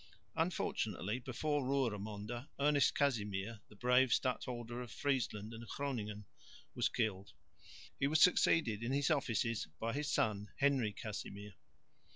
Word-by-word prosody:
Unfortunately 105 +7 -1
before 145 +4 -1
Roeremonde, 115 -2 -2
Ernest 145 0 +4
Casimir, 105 -5 0
the 105 - -16
brave 125 +3 +4
stadholder 120 -2 -1
of 120 - -7
Friesland 115 -7 -1
and 115 +1 -8
Groningen, 105 -8 -3 0.5
was - - +1
killed. 100 -4 -2 0.7
He 140 - +3
was 155 +2 +3
succeeded 155 - +4
in 120 +3 -1
his 145 +3 +2
offices 115 -6 0
by 115 +1 -1
his 150 +2 -1
son, 105 -1 +1
Henry 135 -6 +3
Casimir. 105 -2 -6
120 Hz, 125 wpm, -36 LUFS, 105-140 Hz, 0.7 s, Ernest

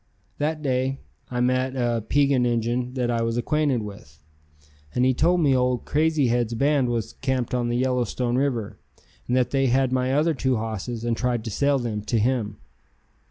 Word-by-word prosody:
That 155 +1 -1
day 130 0 0 0.3
I 125 -1 -2
met 130 +1 +1
a 120 -2 0
Piegan 140 +2 +2
Injun 120 +1 -1
that 125 -2 0
I 115 -1 0
was 115 0 -1
acquainted 140 -1 +1
with, 100 -8 -10 0.8
and 125 - +3
he 130 - +4
told 170 +7 +2
me 140 -4 +4
old 125 -1 0
Crazy 155 -1 +2
Head's 120 -1 0
band 140 0 +2
was 115 -2 -2
camped 130 -3 -2
on 120 -1 0
the 120 - 0
Yellowstone 125 -1 0
River, 120 -6 -1 0.5
and 125 - +1
that 125 -1 +1
they 135 -1 +2
had 130 +1 +2
my 130 0 +1
other 155 +4 +2
two 130 -2 0
hosses 110 +1 -4
and 120 -1 0
tried 120 -2 -1
to 110 - -5
sell 140 +6 +2
them 115 -5 -3
to 115 - 0
him. 110 -2 0
125 Hz, 185 wpm, -24 LUFS, 120-135 Hz, 0.8 s, he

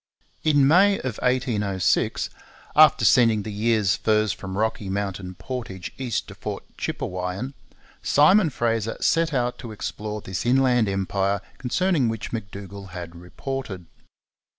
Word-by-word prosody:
In 145 -3 +4
May 195 +6 +6
of 125 -5 -4
1806, 105 -7 +1 0.4
after 150 -7 +6
sending 115 -3 +5
the 110 - -5
year's 105 -2 +2
furs 110 -2 +2
from 95 0 -7
Rocky 110 -2 -1
Mountain 95 -2 -3
Portage 95 -5 -6
east 125 -4 -3
to - - -8
Fort - - -6
Chipewyan, 90 +8 -4 0.5
Simon 165 +5 +5
Fraser 115 -4 -1
set 165 0 +2
out 125 -3 -1
to 115 - -7
explore 105 0 -5
this 95 -4 -4
inland 125 -3 +3
empire 95 +1 0 0.2
concerning 145 0 +1
which 115 0 -5
M'Dougall 100 -2 -7
had 85 -1 -8
reported. 90 +3 -6
110 Hz, 130 wpm, -24 LUFS, 95-130 Hz, 0.5 s, May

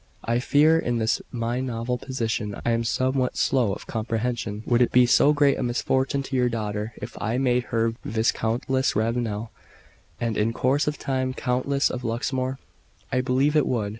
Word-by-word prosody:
"I 120 +1 +1
fear 150 +5 +4
in 120 -6 -1
this 110 -1 0
my 120 +1 -2
novel 125 -1 -2
position 115 -5 -3
I 120 - +2
am 115 0 +1
somewhat 130 +2 0
slow 125 -7 +2
of 95 - -6
comprehension. 115 -1 -3
Would 120 0 +2
it 120 - +3
be 125 0 +6
so 140 +4 +5
great 145 -2 +3
a - - -2
misfortune 130 +3 0
to 135 - -5
your 125 -1 +3
daughter 105 -1 -3
if - - -7
I 115 +3 -1
made 125 -2 +1
her 115 -1 0
Viscountess 115 +4 0
Ravenel, 110 0 -1 0.7
and 115 -2 -1
in 110 +2 +1
course 135 +4 +1
of 150 -1 -1
time 130 -1 -2
Countess 135 +3 0
of 125 -1 -5
Luxmore?" 130 +3 -2 0.5
"I 130 - +2
believe 135 +4 +1
it 150 - +3
would. 110 -5 -1
125 Hz, 175 wpm, -25 LUFS, 115-130 Hz, 0.7 s, be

